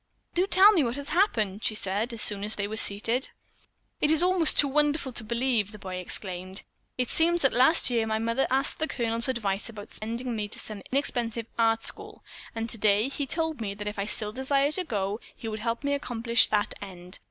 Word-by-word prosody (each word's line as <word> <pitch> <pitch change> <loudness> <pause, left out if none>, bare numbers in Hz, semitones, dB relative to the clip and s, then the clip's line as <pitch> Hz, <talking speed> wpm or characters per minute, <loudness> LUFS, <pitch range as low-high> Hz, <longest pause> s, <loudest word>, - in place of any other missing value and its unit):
"Do 360 +2 +1
tell 395 +2 +7
me 350 -8 +3
what 240 -1 -2
has 285 0 -5
happened," 225 - +1
she 215 - +2
said 210 +4 -2
as 230 -2 0
soon 200 -1 +1
as 210 +1 0
they 200 -1 -2
were 215 - -5
seated. 225 +5 +2 0.7
"It's 315 +2 +3
almost 360 -3 +3
too 290 - +5
wonderful 295 -1 +1
to 235 - -3
believe," 235 -2 0
the 215 - -10
boy 190 -3 -6
exclaimed. 185 +1 -6 0.3
"It 250 -1 -1
seems 340 +1 +3
that 270 - +3
last 260 +3 +5
year 230 -2 +1
my 220 0 0
mother 230 +4 0
asked 270 +2 +2
the 315 - +1
Colonel's 230 -2 -1
advice 210 -4 -2
about 210 -2 -10
sending 235 +3 -4
me 210 -1 -3
to 205 - -7
some 210 -2 -7
inexpensive 240 -4 -1
art 225 0 +2
school, - - -2 0.3
and 225 0 -3
today 215 +1 +2
he 280 0 -4
told 320 -2 -3
me 200 -2 -4
that 210 +1 -6
if 210 0 -4
I 200 - -1
still 210 0 -1
desired 275 +4 0
to 370 - +1
go, 205 -4 -2 0.2
he 225 - -8
would 215 0 -4
help 230 +4 -3
me 285 0 0
accomplish 235 -4 +2
that 210 -1 0
end. 180 -2 -9
230 Hz, 210 wpm, -27 LUFS, 210-275 Hz, 0.7 s, tell